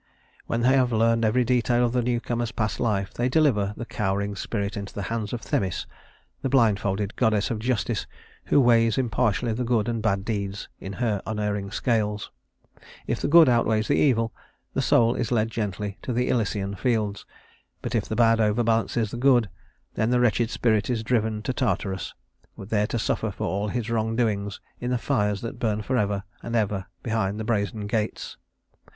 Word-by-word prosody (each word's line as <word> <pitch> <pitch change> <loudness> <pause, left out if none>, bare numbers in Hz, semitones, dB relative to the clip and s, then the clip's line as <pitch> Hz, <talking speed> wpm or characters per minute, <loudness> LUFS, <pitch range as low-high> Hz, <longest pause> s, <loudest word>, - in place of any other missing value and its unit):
When 115 - -1
they 130 +3 +4
have 125 -2 +2
learned 115 +1 +2
every 120 +3 +3
detail 120 0 +2
of 120 - 0
the 125 - +2
newcomer's 120 -1 -1
past 110 -2 -2
life, 100 -5 0
they 120 +1 0
deliver 115 -9 +2
the 120 - -5
cowering 100 -2 -2
spirit 100 0 -3
into 100 -1 -6
the 100 - -3
hands 110 -3 -3
of 120 - -4
Themis, 95 -3 -1 0.6
the 135 - -1
blindfolded 105 -5 +1
goddess 110 -3 +1
of 110 - -2
justice, 120 -1 -1 0.4
who - - +4
weighs 115 -3 +4
impartially 120 -2 +1
the 125 +3 -2
good 115 -3 +1
and 115 -2 -1
bad 100 -3 0
deeds 100 -2 -3
in 95 - -6
her 110 -3 -1
unerring 105 -2 -2
scales. 105 -1 -1 0.7
If - - -2
the - - 0
good 165 +2 +8
outweighs 115 -3 +2
the 145 - +4
evil, 115 -5 +2 0.4
the - - 0
soul 115 0 +4
is 120 -2 -2
led 115 -1 +1
gently 105 -1 -3
to 125 - -3
the 125 +1 0
Elysian 100 -4 0
Fields; 105 -2 -1 0.6
but - - -3
if - - +1
the 110 - -4
bad 115 -1 +4
overbalances 115 0 +1
the - - -5
good, 120 -4 +3 0.4
then 110 - 0
the 125 0 +3
wretched 120 -1 +2
spirit 110 -3 +1
is 115 -3 -1
driven 110 -2 0
to 130 - -1
Tartarus, 100 -7 -2 0.4
there 105 +1 -1
to 120 - -2
suffer 110 0 -1
for 100 - -4
all 100 +2 -1
its 115 0 -3
wrongdoings 110 -3 0 0.2
in 125 - -3
the 125 - +1
fires 105 -3 0
that 115 - -6
burn 110 -2 0
forever 105 -5 0 0.2
and 115 - -4
ever 105 -3 0 0.2
behind 110 -3 -1
the - - -2
brazen 105 -2 -1
gates. 105 +1 -3
110 Hz, 180 wpm, -25 LUFS, 105-120 Hz, 0.7 s, good